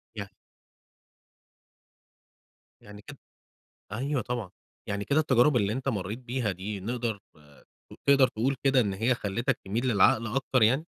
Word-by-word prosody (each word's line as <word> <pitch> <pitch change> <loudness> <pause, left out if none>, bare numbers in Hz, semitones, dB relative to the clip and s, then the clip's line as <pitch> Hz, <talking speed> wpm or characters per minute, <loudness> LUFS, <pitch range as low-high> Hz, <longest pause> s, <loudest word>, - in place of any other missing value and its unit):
ي 100 - -3 2.6
يعني 105 0 -12
كده - - -12 0.8
أيوَه 135 +3 -1
طبعًا، 120 -5 -4 0.4
يعني 100 0 -2
كده 140 +9 +2
التجارب 130 -2 +3
اللي 105 -2 +2
أنت 130 +3 -3
مريت 105 -2 -2
بيها 125 -4 -2
دي 100 +3 -6
نقدر 115 0 -3 0.9
تقدر 135 -2 +6
تقول 130 +4 -1
كده 135 -1 +5
إن 100 -5 0
هي 115 +6 +1
خلتك 115 +4 -1
تميل 115 +7 -1
للعقل 110 +1 +4
أكتر 130 +1 0
يعني؟ 110 +4 +6
115 Hz, 130 wpm, -28 LUFS, 105-130 Hz, 2.6 s, تقدر